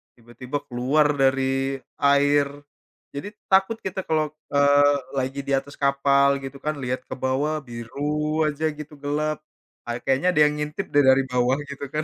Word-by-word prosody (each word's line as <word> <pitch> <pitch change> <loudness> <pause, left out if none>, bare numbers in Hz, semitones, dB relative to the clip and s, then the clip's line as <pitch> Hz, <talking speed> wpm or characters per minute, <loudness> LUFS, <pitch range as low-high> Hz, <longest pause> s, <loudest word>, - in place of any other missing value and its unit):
tiba-tiba 120 +3 -6
keluar 135 +5 +2
dari 135 0 +1 0.2
air. 140 0 +4 0.7
Jadi 145 - -5 0.2
takut 195 +4 +4
kita 190 0 -3
kalau, 155 -1 +2 0.3
eee, 145 0 +5 0.2
lagi 135 +1 -2
di - - -2
atas 140 +1 -13
kapal 140 0 +3
gitu, 135 +1 -7
kan, 155 - 0
lihat 125 0 -2
ke - - -4
bawah 135 +4 0
biru 150 +6 -2
aja 150 +1 -2
gitu 150 0 -8
gelap. 150 +1 -1 0.5
Ah, 120 - -2
kayaknya 135 +6 +1
ada 150 - +6
ngintip, 150 +5 -4
deh, 145 -1 +5
dari 135 +1 +5
bawah, 125 +1 +2
gitu, 140 0 -6
kan? 155 - -1
140 Hz, 155 wpm, -24 LUFS, 135-150 Hz, 0.7 s, ada